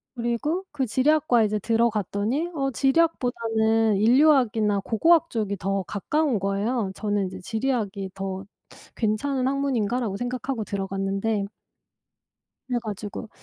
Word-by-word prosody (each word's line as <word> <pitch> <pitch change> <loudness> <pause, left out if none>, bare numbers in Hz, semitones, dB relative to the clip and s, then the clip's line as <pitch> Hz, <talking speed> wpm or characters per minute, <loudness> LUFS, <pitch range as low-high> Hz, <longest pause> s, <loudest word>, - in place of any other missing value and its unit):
그리고 240 +10 -1
그 275 -3 -1
지리학과에 260 -1 +3
이제 210 0 -1
들어갔더니 225 - 0
어 270 -2 0
지리학보다는 225 -7 +2
인류학이나 230 -4 +4
고고학 330 - +3
쪽이 205 -3 -2
더 195 +1 -1
가까운 255 - 0
거예요. 200 +2 -1
저는 205 -2 -1
이제 185 0 -8
'지리학이 215 -3 -2
더 195 0 -5 0.5
괜찮은 255 +4 0
학문인가?'라고 245 -6 0
생각하고 245 -1 -3
들어갔는데 195 +1 -2 1.2
그래 245 -2 0
가지고 210 +1 -6
225 Hz, 320 characters per minute, -25 LUFS, 200-260 Hz, 1.2 s, 인류학이나